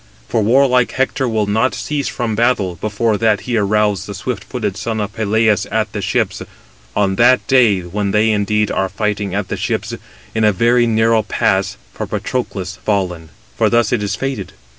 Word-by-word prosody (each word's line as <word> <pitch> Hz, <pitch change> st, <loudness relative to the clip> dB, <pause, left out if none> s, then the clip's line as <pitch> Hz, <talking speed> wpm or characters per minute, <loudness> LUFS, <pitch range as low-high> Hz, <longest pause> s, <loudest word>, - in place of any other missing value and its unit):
For 110 Hz, -, 0 dB
warlike 125 Hz, +2 st, +3 dB
Hector 130 Hz, 0 st, 0 dB
will 110 Hz, -2 st, 0 dB
not 110 Hz, +5 st, +1 dB
cease 145 Hz, -1 st, -2 dB
from 120 Hz, -3 st, -2 dB
battle 110 Hz, -5 st, +1 dB
before 110 Hz, +3 st, -1 dB
that 110 Hz, -3 st, +2 dB
he 125 Hz, -, -3 dB
arouse 105 Hz, -2 st, +1 dB
the 100 Hz, -, -6 dB
swift 115 Hz, +3 st, -4 dB
footed 105 Hz, -7 st, -3 dB
son 110 Hz, +2 st, -3 dB
of 105 Hz, 0 st, -3 dB
Peleus 110 Hz, 0 st, +1 dB
at 110 Hz, -1 st, -1 dB
the 105 Hz, -, -3 dB
ships. -, -, -1 dB, 0.5 s
On 95 Hz, -2 st, +1 dB
that 125 Hz, +2 st, +4 dB
day, 120 Hz, -8 st, +4 dB
when 100 Hz, +4 st, -3 dB
they 105 Hz, +2 st, +3 dB
indeed 105 Hz, 0 st, +1 dB
are 95 Hz, -, 0 dB
fighting 105 Hz, -1 st, -2 dB
at 100 Hz, -2 st, -2 dB
the -, -, -3 dB
ships, -, -, -2 dB, 0.4 s
in 110 Hz, -, 0 dB
a 105 Hz, -, +5 dB
very 120 Hz, +4 st, +3 dB
narrow 110 Hz, 0 st, +3 dB
pass, 105 Hz, -, 0 dB, 0.2 s
for -, -, -5 dB
Patroclus 95 Hz, -7 st, -3 dB
fallen. 90 Hz, -7 st, -2 dB, 0.3 s
For -, -, +2 dB
thus 120 Hz, -1 st, +2 dB
is 105 Hz, -4 st, -1 dB
it -, -, -14 dB
fated. 135 Hz, -8 st, -4 dB
110 Hz, 185 wpm, -17 LUFS, 100-115 Hz, 0.5 s, a